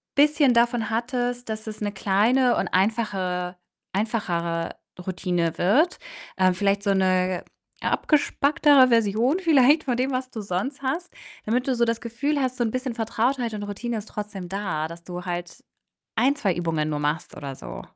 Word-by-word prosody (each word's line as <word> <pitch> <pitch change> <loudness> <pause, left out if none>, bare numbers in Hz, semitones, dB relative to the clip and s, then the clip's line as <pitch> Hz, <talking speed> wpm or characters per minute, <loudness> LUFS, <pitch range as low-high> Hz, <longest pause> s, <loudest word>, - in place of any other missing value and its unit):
bisschen 290 -3 +4
davon 235 -1 +2
hattest, 245 +1 -2
dass 220 0 -5
es 215 - -6
'ne 205 -1 -2
kleine 225 +6 +3
und - - 0
einfache 185 -3 0 0.4
einfachere 175 -6 -1 0.3
Routine 175 -3 -1
wird. 265 - +3 0.4
Ähm, 185 -1 +4
vielleicht 200 +1 +1
so 200 - +1
'ne 185 -1 +1 0.4
abgespecktere 290 -2 +4
Version 230 - +2
vielleicht 305 -3 +5
von 250 -3 0
dem, 255 +2 0
was 255 0 -3
du 220 - -5
sonst 205 +9 -3
hast, 320 +7 -2 0.3
damit 250 +4 0
du 260 - +2
so 235 0 +3
das 230 0 -1
Gefühl 280 +6 -1
hast, 255 0 -1
so 240 - +1
'n 225 - -1
bisschen 255 -2 -3
Vertrautheit 235 +1 0
und 210 - -4
Routine 220 +3 -4
ist 215 0 -7
trotzdem 200 -4 -6
da, 180 -5 -2
dass 170 +1 -11
du 180 0 -7
halt 175 -1 -5 0.5
ein, 260 +5 +3
2 205 -10 0
Übungen 165 -3 -1
nur 150 -1 -2
machst 150 +2 -2
oder 140 -2 -6
so. - - -8
220 Hz, 165 wpm, -24 LUFS, 185-255 Hz, 0.5 s, vielleicht